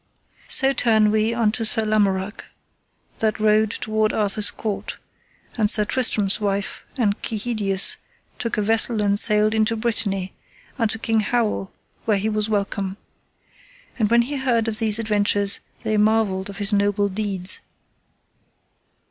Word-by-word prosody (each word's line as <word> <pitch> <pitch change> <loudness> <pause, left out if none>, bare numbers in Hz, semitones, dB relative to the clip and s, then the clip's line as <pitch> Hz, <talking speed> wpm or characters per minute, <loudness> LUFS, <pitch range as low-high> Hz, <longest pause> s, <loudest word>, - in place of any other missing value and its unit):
So 270 0 +5
turn 220 -4 +3
we 220 +1 +1
unto 230 -1 +1
Sir 220 0 +2
Lamorak, 205 -2 0 0.7
that 220 0 0
rode 215 0 +3
toward 215 0 0
Arthur's 210 0 +1
court, 210 -3 -5 0.6
and 210 -1 +3
Sir 210 -1 +3
Tristram's 210 -5 0
wife 200 -1 -2
and 210 -5 0
Kehydius 210 -4 -1 0.4
took 230 -2 -3
a 210 - +1
vessel 225 +1 +1
and 200 0 +3
sailed 215 0 +3
into 220 +1 +1
Brittany, 205 -5 -1 0.5
unto 225 -1 +1
King 225 0 0
Howel, 215 -3 -1 0.3
where 215 -2 +2
he 210 +3 -1
was 215 0 -1
welcome. 200 -2 -2 1.0
And 215 -2 +2
when 235 +1 +4
he 280 +4 -4
heard 240 -4 0
of 215 -1 -2
these 220 -2 +2
adventures 205 -2 0 0.2
they 215 -1 0
marvelled 210 -3 +1
of 200 - -9
his 205 0 0
noble 205 0 +1
deeds. 195 -2 -2
215 Hz, 140 wpm, -22 LUFS, 205-225 Hz, 1.0 s, So